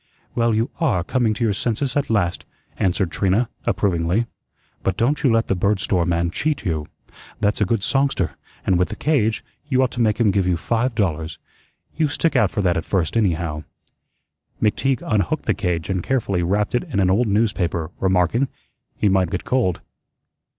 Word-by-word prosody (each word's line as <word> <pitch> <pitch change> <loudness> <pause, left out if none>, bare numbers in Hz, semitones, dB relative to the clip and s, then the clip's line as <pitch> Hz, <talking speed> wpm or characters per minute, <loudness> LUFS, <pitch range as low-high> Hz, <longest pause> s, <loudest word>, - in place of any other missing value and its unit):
"Well, 115 -2 +2
you 115 +2 0
ARE 120 - +1
coming 115 +1 +1
to 120 - -2
your 110 -3 +2
senses 125 +6 -1
at 145 -1 0
last," 90 -6 0 0.3
answered 95 -2 0
Trina, 100 +7 +1 0.2
approvingly. 90 +3 +1 0.6
"But 95 -1 -1
don't 135 +6 +1
you 130 - +3
let 115 0 +2
the - - +1
bird 100 +2 +1
store 90 -3 0
man 85 0 +1
cheat 150 - -1
you. 80 -4 -1 0.5
That's 105 +1 +1
a - - +4
good 100 +1 0
songster; 135 - +1 0.3
and 90 -2 +3
with 90 - +2
the - - -5
cage, 115 -6 +1 0.2
you 130 -2 +3
ought 130 - 0
to 120 - -3
make 110 -1 +2
him 110 -4 +4
give 95 -1 +1
you 90 -2 +2
five 115 +6 -1
dollars. 80 -7 -1 0.6
You 155 0 +2
stick 150 +1 0
out 125 - +4
for 105 - -2
that 90 -2 +2
at 80 - -1
first, 90 -2 0
anyhow." 85 -7 0 1.0
McTeague 125 +4 +1
unhooked 115 +9 0
the - - +2
cage 85 -5 -2
and 95 -2 -1
carefully 100 -6 0
wrapped 100 +4 0
it 125 - +1
in 135 - -2
an 95 -1 +3
old 115 +5 +2
newspaper, 100 -6 0
remarking, 95 +7 +2 0.5
"He - - +2
might 95 -3 +3
get 90 - -4
cold. 115 -9 +1
100 Hz, 185 wpm, -22 LUFS, 90-120 Hz, 1.0 s, a